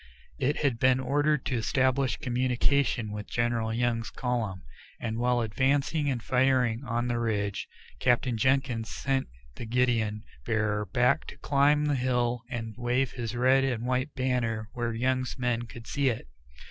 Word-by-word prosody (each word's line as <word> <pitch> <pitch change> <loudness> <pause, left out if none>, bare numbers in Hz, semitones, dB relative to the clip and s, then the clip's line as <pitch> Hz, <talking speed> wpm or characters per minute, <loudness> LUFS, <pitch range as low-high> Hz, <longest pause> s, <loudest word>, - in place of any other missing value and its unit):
It 140 +2 0
had 130 -5 +1
been 130 0 +4
ordered 145 +2 +1
to 130 - 0
establish 130 +3 +1
communication 125 -2 +1
with 105 0 -6
General 120 -1 0
Young's 115 0 0
column, 115 -7 -2 0.4
and 110 0 -3
while 120 0 +2
advancing 140 +6 +1
and 120 -4 -2
firing 125 -2 +2
on 120 -1 -1
the 120 -1 0
ridge, 105 -3 -1 0.3
Captain 125 - +2
Jenkins 130 -2 +1
sent 135 -1 -1 0.3
the - - -5
guidon 115 -3 +1 0.2
bearer 105 - 0
back 125 +6 +2
to - - -9
climb 145 +1 +3
the 150 - +1
hill 125 -2 0
and 115 -3 -4
wave 125 +1 +1
his 120 -2 -4
red 130 +2 +4
and 125 -3 -1
white 130 +3 -1
banner 120 -4 -1
where 120 -1 -2
Young's 130 +3 -1
men 120 -2 -1
could 115 0 -11
see 140 +1 +1
it. 110 - -4
125 Hz, 155 wpm, -28 LUFS, 115-130 Hz, 0.4 s, been